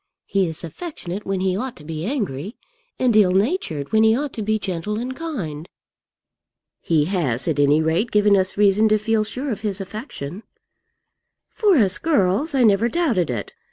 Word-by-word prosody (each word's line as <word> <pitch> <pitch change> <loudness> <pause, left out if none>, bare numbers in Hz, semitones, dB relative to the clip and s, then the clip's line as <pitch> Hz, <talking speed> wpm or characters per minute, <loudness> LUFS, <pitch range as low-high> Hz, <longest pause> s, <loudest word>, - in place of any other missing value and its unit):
He 195 -2 +1
is 160 +1 -6
affectionate 195 - -7
when 195 -1 -1
he 185 -1 +1
ought 250 +5 -4
to 155 - -14
be 160 +1 -5
angry, 205 - -3 0.4
and 250 -3 +2
ill 195 -4 +5
natured 190 - -1
when 220 - +4
he 220 +1 +4
ought 290 0 -3
to 220 - -5
be 215 +1 0
gentle 195 +1 -3
and 250 +3 -4
kind." 185 - -5 1.1
"He 155 -3 +1
has, 155 -9 -1
at 155 -3 0
any 145 +2 +4
rate, 170 +9 +1
given 210 -1 +4
us 190 0 +1
reason 210 +1 +4
to 215 - +4
feel 215 +1 +1
sure 255 +6 -4
of 215 - -4
his 205 -2 -2
affection." 195 - -7 1.1
"For 410 -6 +3
us 200 -5 +3
girls, 285 - +1
I 260 - +4
never 220 +1 +4
doubted 255 - +1
it. - - -4
205 Hz, 180 wpm, -22 LUFS, 175-235 Hz, 1.1 s, ill